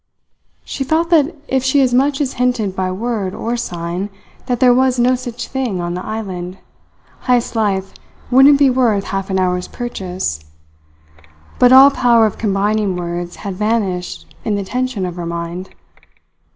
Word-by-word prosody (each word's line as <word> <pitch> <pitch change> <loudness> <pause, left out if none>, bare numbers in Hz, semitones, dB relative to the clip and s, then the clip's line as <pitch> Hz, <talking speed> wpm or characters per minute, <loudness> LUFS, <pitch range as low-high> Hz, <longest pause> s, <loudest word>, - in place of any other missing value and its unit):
She 275 - -4
felt 320 +5 0
that 320 0 +3
if 265 -1 0
she 265 +2 +2
as 255 -2 +2
much 275 +2 +2
as 270 -3 -1
hinted 230 -6 0
by 185 -1 -1
word 205 -1 -3
or 235 +2 -2
sign 175 -3 -4 0.4
that 245 -2 -1
there 250 -1 +5
was 260 0 +2
no 245 +1 +3
such 245 -2 -5
thing 255 -8 -2
on 175 0 -3
the 180 +1 -5
island, 190 -4 -5 0.7
Heyst's 245 -1 +1
life 195 -3 -1 0.4
wouldn't 270 +3 +7
be 280 -1 +4
worth 235 -6 +2
half 195 0 -4
an 190 - 0
hour's 180 -1 0
purchase; 185 - -4 1.2
but 250 0 +6
all 270 +2 +9
power 235 -4 +4
of 215 - -3
combining 205 -1 0
words 175 0 -4
had 200 - -3
vanished 195 -3 -2 0.2
in 210 - -1
the 200 - -2
tension 250 -1 -2
of 180 -1 -6
her 175 - -4
mind. 170 +2 -5
215 Hz, 165 wpm, -17 LUFS, 185-250 Hz, 1.2 s, all